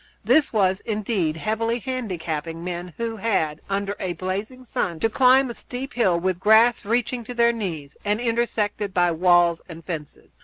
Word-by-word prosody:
This 310 Hz, -2 st, +4 dB
was, 190 Hz, -3 st, +2 dB
indeed, 205 Hz, -8 st, -1 dB
heavily 225 Hz, +5 st, -1 dB
handicapping 170 Hz, -, -4 dB
men 175 Hz, -1 st, -5 dB
who 230 Hz, -1 st, -3 dB
had, 160 Hz, -8 st, 0 dB
under 200 Hz, 0 st, -1 dB
a 185 Hz, -2 st, -2 dB
blazing 200 Hz, +8 st, -4 dB
sun, 175 Hz, -8 st, -2 dB
to 225 Hz, -, +2 dB
climb 260 Hz, +2 st, +5 dB
a -, -, -6 dB
steep 260 Hz, +3 st, -7 dB
hill, 190 Hz, -8 st, +2 dB
with 185 Hz, 0 st, -1 dB
grass 220 Hz, +4 st, +5 dB
reaching 240 Hz, +2 st, 0 dB
to 245 Hz, -, -7 dB
their 235 Hz, 0 st, +4 dB
knees, 165 Hz, -10 st, -5 dB
and 210 Hz, +1 st, 0 dB
intersected 225 Hz, -4 st, -1 dB
by 175 Hz, -1 st, +3 dB
walls 175 Hz, 0 st, +3 dB
and 165 Hz, -1 st, -10 dB
fences. 155 Hz, -5 st, -8 dB
205 Hz, 165 wpm, -23 LUFS, 175-235 Hz, -, climb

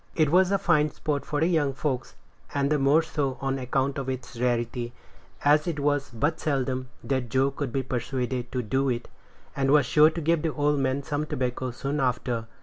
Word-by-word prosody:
It 155 Hz, -3 st, +3 dB
was 185 Hz, +2 st, +4 dB
fine 150 Hz, -4 st, +3 dB
sport 145 Hz, -2 st, -3 dB
for 145 Hz, -, -1 dB
the 160 Hz, -, +3 dB
young 155 Hz, -5 st, +2 dB
folks, 135 Hz, -2 st, -3 dB, 0.4 s
and 140 Hz, 0 st, +1 dB
the 150 Hz, -, +3 dB
more 140 Hz, +4 st, +4 dB
so 145 Hz, -5 st, -2 dB
on 135 Hz, 0 st, -1 dB
account 135 Hz, +2 st, -1 dB
of 135 Hz, -1 st, -4 dB
its 130 Hz, -1 st, -5 dB
rarity, 120 Hz, 0 st, -1 dB, 0.5 s
as 150 Hz, +2 st, +4 dB
it 160 Hz, -3 st, -2 dB
was 145 Hz, 0 st, +1 dB
but 145 Hz, +7 st, -1 dB
seldom 130 Hz, -3 st, -1 dB
that 130 Hz, -3 st, -1 dB
Joe 135 Hz, +3 st, +2 dB
could 135 Hz, -2 st, -4 dB
be 135 Hz, +2 st, -1 dB
persuaded 125 Hz, 0 st, -3 dB
to 125 Hz, -1 st, -2 dB
do 135 Hz, +5 st, 0 dB
it, 120 Hz, -1 st, -2 dB, 0.5 s
and 135 Hz, -1 st, +1 dB
was 145 Hz, -1 st, +5 dB
sure 150 Hz, +4 st, +6 dB
to 165 Hz, -, -5 dB
give 165 Hz, 0 st, +2 dB
the 160 Hz, -2 st, -1 dB
old 145 Hz, -1 st, +2 dB
man 135 Hz, +1 st, 0 dB
some 150 Hz, +1 st, -2 dB
tobacco 125 Hz, -1 st, -2 dB
soon 140 Hz, +4 st, -3 dB
after. 125 Hz, -3 st, -1 dB
135 Hz, 200 wpm, -26 LUFS, 130-150 Hz, 0.5 s, sure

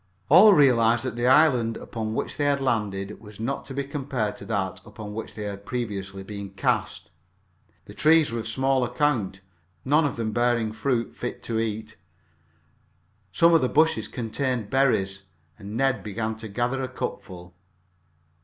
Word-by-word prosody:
All 195 Hz, +6 st, +8 dB
realized 120 Hz, -5 st, +4 dB
that 125 Hz, -3 st, -3 dB
the 120 Hz, +1 st, 0 dB
island 130 Hz, -5 st, +4 dB
upon 110 Hz, -1 st, -5 dB
which -, -, -3 dB
they 145 Hz, -, 0 dB
had 140 Hz, -1 st, +2 dB
landed 105 Hz, -6 st, -2 dB
was 105 Hz, -1 st, -13 dB
not 125 Hz, +5 st, -3 dB
to 135 Hz, -, -8 dB
be 140 Hz, -, -1 dB
compared 135 Hz, -6 st, -3 dB
to -, -, -10 dB
that 95 Hz, -1 st, -2 dB
upon 105 Hz, 0 st, -9 dB
which 110 Hz, +1 st, -7 dB
they 105 Hz, -, -5 dB
had 100 Hz, -1 st, -6 dB
previously 100 Hz, -3 st, -4 dB
been 100 Hz, 0 st, -7 dB
cast. 90 Hz, -3 st, -2 dB, 0.7 s
The -, -, -12 dB
trees 155 Hz, -3 st, +4 dB
were 115 Hz, -, -2 dB
of 110 Hz, -, -5 dB
small 130 Hz, +3 st, +1 dB
account, 120 Hz, -7 st, 0 dB, 0.4 s
none 150 Hz, +4 st, +3 dB
of 145 Hz, -, -1 dB
them 115 Hz, -2 st, -2 dB
bearing 120 Hz, -1 st, +1 dB
fruit 120 Hz, +1 st, -1 dB
fit 120 Hz, -, -5 dB
to 115 Hz, -1 st, -2 dB
eat. 110 Hz, 0 st, -4 dB, 1.3 s
Some 170 Hz, 0 st, +4 dB
of 165 Hz, -, +5 dB
the 130 Hz, -, +1 dB
bushes 155 Hz, -8 st, +2 dB
contained 120 Hz, -2 st, -3 dB
berries, 100 Hz, -8 st, +1 dB, 0.4 s
and 105 Hz, +2 st, -6 dB
Ned 135 Hz, -4 st, +1 dB
began 110 Hz, +2 st, -3 dB
to 110 Hz, 0 st, -8 dB
gather 120 Hz, +5 st, -1 dB
a 130 Hz, -, -2 dB
cupful. 90 Hz, -7 st, -7 dB
115 Hz, 165 wpm, -25 LUFS, 105-135 Hz, 1.3 s, All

